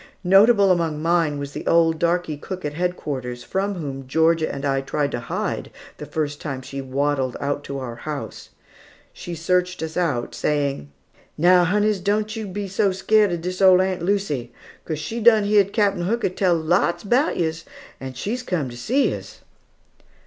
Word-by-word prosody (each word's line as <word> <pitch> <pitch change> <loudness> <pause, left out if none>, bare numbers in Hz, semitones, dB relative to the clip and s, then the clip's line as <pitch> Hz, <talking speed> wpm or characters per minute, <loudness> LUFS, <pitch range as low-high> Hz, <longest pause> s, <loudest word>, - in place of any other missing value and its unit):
Notable 200 +2 +5
among 165 -4 0
mine 165 -2 +1
was 140 0 -5
the - - -7
old 165 -1 +3
darkey 170 -2 0
cook 185 +4 -7
at 150 - -3
headquarters, 145 -8 -3
from 195 +1 -2
whom 135 -6 -6
Georgia 160 +2 +2
and 140 0 -5
I 135 -1 +1
tried 140 +1 -1
to 120 - -3
hide, 115 - -3 0.3
the 150 - -8
first 150 0 -3
time 135 -3 -5
she 135 +1 -6
waddled 135 -1 -1
out 145 +1 -2
to 140 - -5
our 120 -3 -6
house. 150 0 -6 0.6
She 175 - -7
searched 180 +2 0
us 160 0 -5
out, 145 -10 -1
saying: 140 - -1 0.5
"Now, 180 +2 +5
honeys, 205 +2 +1
don't 210 +3 -1
yo 220 -2 -5
be 200 +1 -4
so 195 +1 +1
scared 210 +1 +3
of 170 -1 -3
dis 180 +2 -4
ole 185 -1 +7
Aunt 185 -1 0
Lucy, 170 - -1 0.3
'cos 155 - -3
she's 225 +11 -4
done 220 -2 +6
heared 205 -1 +3
Captain 200 -4 +1
Hooker 230 +3 0
tell 185 -1 +1
lots 170 +2 +1
'bout 250 +9 +1
yos, 165 -1 -1 0.4
and 130 -1 -7
has 230 - -3
come 165 - -2
to 120 - -9
see 260 - +1
yos." - - -8
170 Hz, 180 wpm, -22 LUFS, 145-195 Hz, 0.6 s, ole